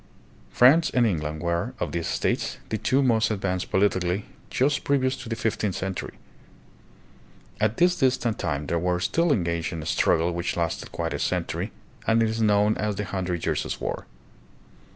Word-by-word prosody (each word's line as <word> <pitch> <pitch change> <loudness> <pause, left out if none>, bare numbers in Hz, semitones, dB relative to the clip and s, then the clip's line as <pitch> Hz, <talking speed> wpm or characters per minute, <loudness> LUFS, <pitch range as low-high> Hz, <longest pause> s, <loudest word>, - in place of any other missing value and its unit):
France 155 +7 +5
and 125 -1 +3
England 75 -6 -1
were, 85 0 -1
of - - -2
these 85 -1 -2
states, - - -1
the 110 - -1
two 135 +6 +2
most 115 -3 +3
advanced 95 -3 -2
politically 95 -1 +1 0.2
just 140 +2 +1
previous 130 -2 +1
to 125 -4 -9
the 115 - -1
fifteenth 105 -3 -1
century. 95 0 -4 1.4
At 110 +1 +1
this 180 +1 +4
distant 125 - +1
time 75 0 -2
they 85 - 0
were 90 +1 0
still 165 - +1
engaged 85 - 0
in 80 -2 -5
a - - -8
struggle 85 +1 +2
which 85 +1 -2
lasted 85 -1 -2
quite 85 -2 -3
a 70 - -3
century - - -2 0.4
and 115 0 +4
is 110 0 -1
known 105 0 +3
as 105 -1 -1
the 105 +1 -3
Hundred 90 -3 -3
Years' - - -1
War. - - -4
100 Hz, 170 wpm, -25 LUFS, 85-115 Hz, 1.4 s, France